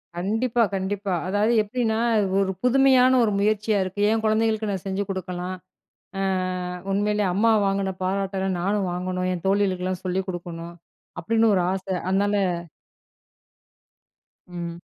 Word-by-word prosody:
கண்டிப்பா, 225 Hz, +6 st, +1 dB
கண்டிப்பா. 195 Hz, 0 st, -2 dB
அதாவது 205 Hz, +4 st, +2 dB
எப்டின்னா, 220 Hz, +1 st, -1 dB, 0.4 s
ஒரு 190 Hz, -1 st, +1 dB
புதுமையான 260 Hz, 0 st, +5 dB
ஒரு 210 Hz, -, +2 dB
முயற்சியா 210 Hz, 0 st, +1 dB
இருக்கு. 190 Hz, +2 st, -4 dB
"என் 225 Hz, 0 st, 0 dB
குழந்தைகளுக்கு 220 Hz, 0 st, +1 dB
நான் 190 Hz, -1 st, -4 dB
செஞ்சு 195 Hz, +1 st, -1 dB
குடுக்கலாம். 185 Hz, -1 st, -4 dB, 0.6 s
அ -, -, -1 dB, 0.7 s
உண்மையிலே 210 Hz, +1 st, +1 dB
அம்மா 225 Hz, +3 st, +3 dB, 0.2 s
வாங்குன 195 Hz, -1 st, 0 dB
பாராட்டல்லாம் 190 Hz, -1 st, -1 dB
நானும் 195 Hz, 0 st, 0 dB
வாங்கணும். 180 Hz, 0 st, -2 dB
என் 180 Hz, 0 st, -5 dB
தோழிகளுக்கெல்லாம் 185 Hz, -2 st, 0 dB
சொல்லி 185 Hz, +1 st, 0 dB
குடுக்கணும்." 170 Hz, -1 st, -6 dB, 0.5 s
அப்டீன்னு 225 Hz, +4 st, +2 dB
ஒரு 180 Hz, -, +2 dB
ஆசை. 190 Hz, 0 st, -3 dB
அதனால, 200 Hz, +2 st, +1 dB, 2.1 s
ம். 170 Hz, -1 st, -6 dB
195 Hz, 120 wpm, -24 LUFS, 185-215 Hz, 2.1 s, புதுமையான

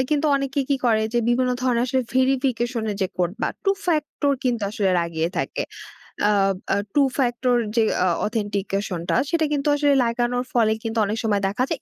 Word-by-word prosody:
কিন্তু 300 Hz, 0 st, +2 dB
অনেকে 275 Hz, 0 st, -1 dB
কি 280 Hz, -, +2 dB
করে 220 Hz, -3 st, +3 dB
যে 240 Hz, -, +2 dB
বিভিন্ন 250 Hz, +1 st, +2 dB
ধরনের 245 Hz, -2 st, +2 dB
আসলে 260 Hz, +1 st, +1 dB
ভেরিফিকেশন 255 Hz, -2 st, +1 dB
এর 205 Hz, -, -4 dB
যে 190 Hz, -, +2 dB
কোড 175 Hz, -1 st, +1 dB
বা -, -, +2 dB, 0.2 s
টু 390 Hz, -, +4 dB, 0.2 s
ফ্যাক্টর 300 Hz, -3 st, 0 dB
কিন্তু 235 Hz, -4 st, 0 dB
আসলে 200 Hz, -3 st, 0 dB
লাগিয়ে 165 Hz, -1 st, -1 dB
থাকে। -, -, -2 dB, 0.7 s
আ -, -, +4 dB, 0.4 s
আ -, -, +3 dB, 0.2 s
টু 290 Hz, -, +4 dB, 0.2 s
ফ্যাক্টর 245 Hz, -1 st, +1 dB, 0.2 s
যে 230 Hz, -, +4 dB, 0.2 s
অ -, -, +3 dB, 0.2 s
অথেন্টিকেশনটা 200 Hz, -4 st, -2 dB
সেটা 330 Hz, -2 st, +1 dB
কিন্তু 290 Hz, -1 st, -1 dB
আসলে 290 Hz, -1 st, +3 dB
লাগানোর 240 Hz, +1 st, 0 dB
ফলে 225 Hz, -3 st, +3 dB
কিন্তু 225 Hz, 0 st, -3 dB
অনেক 210 Hz, +2 st, -2 dB
সময় 205 Hz, -3 st, +1 dB
দেখা 250 Hz, +6 st, 0 dB
যায়। 310 Hz, -, -2 dB
240 Hz, 185 wpm, -23 LUFS, 210-270 Hz, 0.7 s, টু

